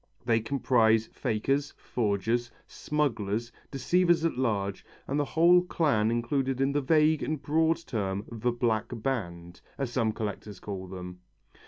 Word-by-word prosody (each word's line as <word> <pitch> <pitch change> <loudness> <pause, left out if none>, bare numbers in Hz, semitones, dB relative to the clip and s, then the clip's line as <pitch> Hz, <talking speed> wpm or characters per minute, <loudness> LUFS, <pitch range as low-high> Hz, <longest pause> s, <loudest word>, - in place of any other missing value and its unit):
They 115 -2 +3
comprise 115 -3 +2
fakers, 135 +6 -1
forgers, 115 +2 -1 0.2
smugglers, 120 -6 -2 0.2
deceivers 170 +5 +2
at 165 - 0
large, 100 -6 -1 0.2
and 140 +2 -1
the 145 - +1
whole 170 +4 +5
clan 145 -11 +1
included 130 +3 -1
in 135 +1 +2
the 145 +1 +1
vague 155 +2 +3
and 155 -1 -2
broad 160 +3 +2
term 100 -2 -2
"the 115 +1 -1
black 115 -3 0
band," 90 -9 -4 0.2
as 135 -4 -3
some 115 -3 +1
collectors 105 -2 -5
call 95 -2 -6
them. 90 -1 -8
120 Hz, 140 wpm, -28 LUFS, 105-145 Hz, 0.2 s, whole